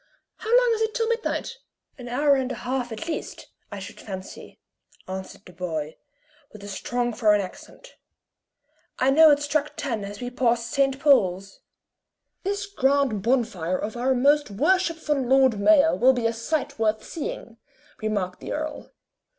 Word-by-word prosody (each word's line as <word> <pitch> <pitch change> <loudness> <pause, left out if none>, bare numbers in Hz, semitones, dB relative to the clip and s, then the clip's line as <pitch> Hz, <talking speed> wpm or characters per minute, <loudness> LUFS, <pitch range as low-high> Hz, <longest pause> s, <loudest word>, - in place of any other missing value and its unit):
How 440 - -7
long - - +5
is 445 - -2
it 445 0 -1
till 455 -2 0
midnight?" 465 +1 -2 0.4
"An 245 - -8
hour 285 +4 +3
and 265 -1 0
a - - -3
half 250 -1 -2
at 275 +9 -6
least, 325 - -5 0.2
I 205 - -6
should 195 0 -9
fancy," 190 -2 -9 0.5
answered 190 +2 -7
the 180 - -14
boy, 160 -3 -4 0.6
with 210 -2 -13
a - - -8
strong 240 +4 -2
foreign 215 -2 +3
accent. 205 - -9 1.0
"I 260 +1 +3
know 315 +3 +7
it 290 0 +3
struck 290 0 -1
ten 230 -7 -3
as 200 +1 -7
we 245 0 -5
passed 240 -2 0
St. 275 -2 +1
Paul's." 195 -9 +2 0.8
"This 400 +1 -2
grand 280 - +1
bonfire 215 -7 0
of 215 +2 -5
our 255 +2 +1
most 285 +3 +3
worshipful 315 - +1
Lord 260 -3 +3
Mayor 315 +7 +5
will 260 +2 +5
be 245 -2 -2
a 230 - +2
sight 250 +4 -3
worth 220 -1 +1
seeing," 465 +10 -6 0.4
remarked 200 -4 -2
the - - -5
earl. 310 0 -5
255 Hz, 160 wpm, -25 LUFS, 210-300 Hz, 1.0 s, know